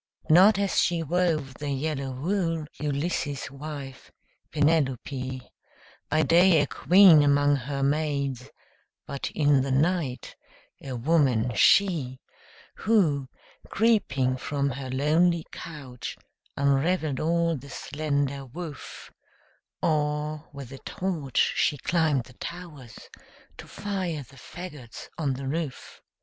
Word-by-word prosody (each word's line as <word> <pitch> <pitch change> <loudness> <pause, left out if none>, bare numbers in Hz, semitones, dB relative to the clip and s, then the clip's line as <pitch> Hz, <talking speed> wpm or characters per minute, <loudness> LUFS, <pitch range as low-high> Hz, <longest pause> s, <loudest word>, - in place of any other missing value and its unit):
Not 190 +6 +7
as 200 -1 +1
she 170 -1 +1
wove 160 -4 0
the 145 -1 -4
yellow 140 0 -2
wool, 165 +3 -1
Ulysses' 145 -2 -2
wife, 140 -2 -8 0.4
Penelope; 135 -4 -1 0.6
By 155 +1 +2
day 170 +3 +5
a 145 - +3
queen 180 +1 +6
among 145 0 +3
her 140 +1 -3
maids, 140 -3 -1 0.6
But 140 -1 -4
in 145 -3 +4
the 135 - -2
night 140 -3 0 0.5
a 135 - -6
woman, 125 -4 +2
she, 145 - +3 0.6
Who, 160 - +2 0.4
creeping 140 - +1
from 140 +1 -2
her 130 0 -6
lonely 160 +5 +2
couch, 135 -7 -8 0.4
Unraveled 140 +1 +1
all 170 +1 +1
the 140 0 -10
slender 140 0 -2
woof; 155 +2 -9 0.7
Or, 150 0 -1
with 140 -3 -9
a 135 - -9
torch, 165 -9 -1
she 145 - +2
climbed 150 -2 +1
the 125 - -16
towers, 150 -6 -9 0.6
To - - -10
fire 185 -7 -4
the 135 - -18
fagots 150 -6 -10
on 145 -4 0
the 135 +1 -6
roof! 150 -1 -5
145 Hz, 115 wpm, -26 LUFS, 135-165 Hz, 0.7 s, Not